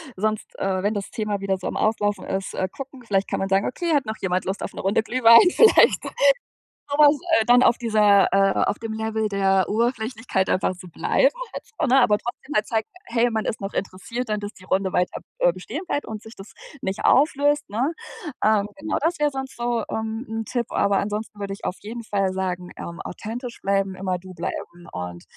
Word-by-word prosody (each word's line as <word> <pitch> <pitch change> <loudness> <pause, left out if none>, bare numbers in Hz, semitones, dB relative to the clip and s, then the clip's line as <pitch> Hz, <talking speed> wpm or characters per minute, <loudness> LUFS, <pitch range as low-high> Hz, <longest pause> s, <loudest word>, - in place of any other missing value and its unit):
sonst, 215 +2 -2
äh, 190 -1 -1
wenn 205 +2 +1
das 200 -2 -4
Thema 210 -2 -2
wieder 195 -1 0
so 185 - -5
am - - -4
Auslaufen 205 -2 0
ist, 190 0 -3
äh, 185 - -1
gucken. 270 -2 -9
Vielleicht 195 -3 +1
kann - - -1
man 195 - -2
sagen: 195 +1 +2
„Okay, 340 +5 -1
hat 285 -4 +2
noch 220 0 -3
jemand 185 -1 0
Lust 190 +1 -3
auf - - -4
'ne - - -8
Runde 195 +3 +1
Glühwein?“ 230 +5 +7
Vielleicht 455 - +6 0.9
sowas, 290 +1 +5 0.2
äh, - - -1
dann 245 +1 +6
auf 235 - +4
dieser 210 -4 +4
äh, 195 0 +4
auf - - -1
dem 225 -1 -5
Level 220 0 -1
der 195 -2 +2
Oberflächlichkeit 225 -3 -1
einfach 185 - +1
zu 180 - -11
bleiben - - +2 0.2
halt - - -6 0.2
so, 320 - +2
ne? 265 +2 +5
Aber 210 -5 +4
trotzdem 240 +6 -7
halt 210 - +3
zeigen, 220 -1 -1 0.2
hey, 235 +1 +2
man 220 -1 -1
ist - - -2
noch 195 0 -4
interessiert 200 +6 -4
dann, 210 0 0
dass 205 0 -6
die 185 - -17
Runde 190 0 0
weiter, 180 0 0 0.2
äh, 175 - +4
bestehen 200 - -6
bleibt 290 - -1
und 215 -1 -6
sich 220 +1 -13
das 195 +1 -12 0.3
nicht 190 +1 -3
auflöst, 290 +1 +3
ne? 250 +10 0 0.5
Ähm, 210 -2 +3
genau, 305 +2 -2
das 330 +2 0
wäre 295 -1 +2
sonst 265 0 -6
so, 240 -1 -1
ähm, 220 +2 -3
'n 225 0 -3
Tipp, 240 +1 -2
aber 200 0 +2
ansonsten 210 +1 -4
würde 200 -1 -4
ich 195 - -9
auf 180 - -2
jeden 230 +3 -7
Fall 195 -3 0
sagen, 180 -1 -3
ähm, 170 0 -7
authentisch 235 +5 -6
bleiben, 195 -1 0
immer 185 -1 -2
du 185 +1 -12
bleiben 175 0 -6
und, 90 -1 -6
215 Hz, 215 wpm, -23 LUFS, 195-240 Hz, 0.9 s, Glühwein